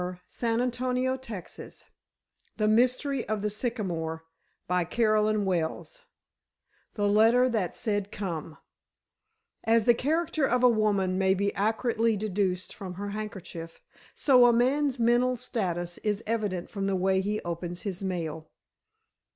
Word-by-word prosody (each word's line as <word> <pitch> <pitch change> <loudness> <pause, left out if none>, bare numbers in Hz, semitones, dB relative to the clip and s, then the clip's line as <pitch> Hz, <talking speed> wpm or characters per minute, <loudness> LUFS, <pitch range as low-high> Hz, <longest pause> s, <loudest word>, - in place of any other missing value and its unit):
A 180 0 -5
Final 235 +1 0
Confession 250 +1 -2 0.2
317 225 -8 -8 0.8
THE 215 -1 +1
MYSTERY 250 +3 +2
OF 215 -2 -1
THE 210 - 0
SYCAMORE 180 -8 -3 0.4
CHAPTER 180 +5 +1
I 200 -6 0 1.1
THE 205 -2 +1
LETTER 225 +5 +5
THAT 215 -8 -1
SAID 205 -3 -1
COME 165 -5 -5 1.1
As 225 -1 +3
the 240 - +6
character 310 +3 0
of 250 +1 +1
a 250 - +8
woman 200 -4 +1
may 190 0 +3
be 200 +1 0
accurately 225 +1 +1
deduced 190 -3 -1
from 185 -3 -8
her 200 +2 -5
handkerchief, 190 -6 -7 0.4
so 250 -4 +6
a - - +6
man's 265 +3 +2
mental 240 +2 +2
status 175 -8 -3
is 210 0 -2
evident 210 -5 -2
from 195 -2 -2
the 195 - +1
way 190 +1 +2
he 210 +2 -1
opens 175 +1 -5
his 195 -3 -4
mail. 165 -4 -4
210 Hz, 135 wpm, -28 LUFS, 185-235 Hz, 1.1 s, a